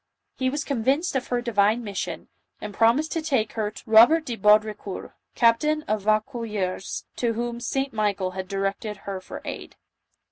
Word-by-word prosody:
He 260 -1 +2
was 290 +3 -2
convinced 275 +5 0
of 260 - -1
her 245 -1 0
divine 220 0 +2
mission, 200 -3 -5 0.3
and 210 -1 -7
promised 235 +9 +3
to 330 - -1
take 265 -9 0
her 215 -2 -1
to - - -13
Robert 235 +9 +6
de 240 - -3
Baudricourt, 210 -1 +1 0.2
captain 300 +7 +3
of 215 -8 -1
Vaucouleurs, 215 -4 -1
to 235 -2 0
whom 235 +1 -3
St. 270 +3 -2
Michael 205 -4 0
had 185 0 -5
directed 195 +2 -3
her 195 -2 -4
for - - -9
aid. - - -7
225 Hz, 165 wpm, -25 LUFS, 210-260 Hz, 0.3 s, Robert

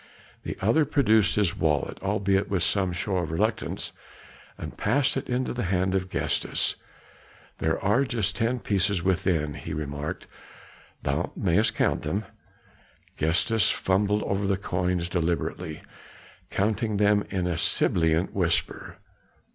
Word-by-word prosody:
The - - -5
other 115 +11 +4
produced 110 -8 +3
his 100 -5 +2
wallet, 75 -2 0
albeit 100 0 +1
with 95 -4 +1
some 95 0 +2
show 95 +2 -2
of 85 -4 -1
reluctance, 110 +7 -1 0.7
and - - -7
passed 130 +6 +1
it 135 - -4
into 125 +1 -1
the 120 -4 -2
hand 95 +1 +1
of 95 -1 -1
Gestas. - - 0 0.9
"There 80 0 0
are 105 +7 +2
just 110 -7 0
ten 120 +1 0
pieces 100 -2 +1
within," 85 -5 +1
he - - -6
remarked. 75 0 -4 0.8
"Thou 75 +6 -1
mayest 100 +4 +2
count - - +1
them." 95 +8 -2 0.9
Gestas 90 +8 +3
fumbled 105 +2 +1
over 100 0 -1
the 100 -1 +1
coins 90 -3 -1
deliberately, 85 -3 -2 0.7
counting 105 +1 0
them 105 0 +3
in 95 -3 -1
a 90 -2 0
sibilant 80 +2 +2
whisper. 85 -4 -1
95 Hz, 130 wpm, -26 LUFS, 85-105 Hz, 0.9 s, other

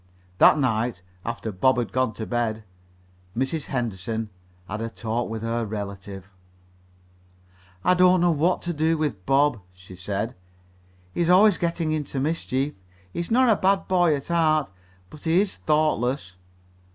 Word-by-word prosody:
That - - +7
night, 115 -7 0 0.2
after 110 - -4
Bob 125 +8 +2
had 115 -5 -2
gone 130 -2 0
to 110 - -5
bed, 115 -2 -2 0.7
Mrs. 140 +4 -1
Henderson 110 -3 -3 0.4
had 105 +2 -4
a 115 - -3
talk 115 +1 -3
with 110 0 -5
her 115 +1 -1
relative. 100 -2 -6 1.5
"I 180 - +4
don't 180 0 +5
know 175 0 +4
what 165 +4 +1
to 175 - -2
do 160 +1 +1
with 140 -12 -2
Bob," 140 -3 +3
she 90 0 -14
said. 100 +5 -3 0.8
"He - - -1
is 170 - +1
always 195 +2 +6
getting 170 -2 -1
into 150 -3 -2
mischief. 140 -1 -1 0.4
He - - -4
is 170 - -3
not 255 +3 +4
a 225 - +5
bad 195 0 +1
boy 175 -4 +3
at 140 +2 -7
heart, 155 - +2 0.4
but 155 - -11
he 165 +2 +4
is 200 -1 -1
thoughtless." 140 -9 0
135 Hz, 155 wpm, -24 LUFS, 110-165 Hz, 1.5 s, That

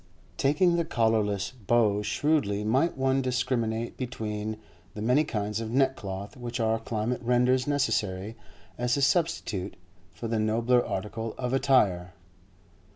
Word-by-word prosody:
Taking 170 +5 +3
the 170 - +2
collarless, 110 -7 0 0.2
how 110 -4 +3
shrewdly 105 -4 0
might 130 +11 +1
one 135 0 +2
discriminate 120 -3 -1
between 110 -3 -4 0.4
the 105 - -5
many 125 +6 +4
kinds 105 -6 -2
of 110 - -4
neckcloth 110 -5 -1
which 120 -1 -5
our 110 0 +1
climate 115 +2 -2
renders 125 +2 +2
necessary 110 -8 0 0.4
as 125 +2 +1
a - - 0
substitute 130 - 0 0.4
for 115 - -5
the 115 -1 0
nobler 115 +3 +2
article 110 +3 -4
of 125 0 -2
attire! 100 -10 +2
115 Hz, 130 wpm, -27 LUFS, 105-130 Hz, 0.4 s, many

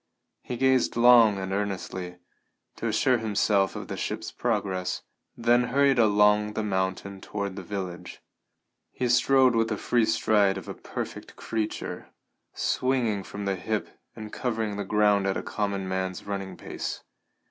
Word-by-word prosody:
He 125 - -5
gazed 130 0 +2
long 115 -3 +7
and 95 0 -4
earnestly, 95 -3 -3 0.6
to - - -3
assure 125 -2 +2
himself 105 -2 +1
of - - -6
the - - -4
ship's - - -4
progress, 95 -2 -2 0.3
then 120 +1 +3
hurried 135 0 +3
along 105 -1 +4
the 110 - -2
mountain 95 0 -2
toward 100 -2 -4
the 100 - -6
village. 95 -2 -6 0.7
He 125 - -2
strode 130 +1 +4
with 115 0 +2
the 110 -2 -2
free 120 +1 +2
stride 105 -3 +2
of 95 - -8
a - - -5
perfect - - -7
creature, 110 -1 -4 0.5
swinging 125 -6 0
from 100 +1 -7
the 100 -1 0
hip 105 +3 -3 0.3
and 110 -1 -9
covering 110 -4 -2
the 100 -1 -4
ground 105 -1 +3
at 95 - 0
a - - -4
common 100 -2 -2
man's 95 -1 -3
running 100 -1 -5
pace. - - -5
105 Hz, 150 wpm, -27 LUFS, 95-115 Hz, 0.7 s, long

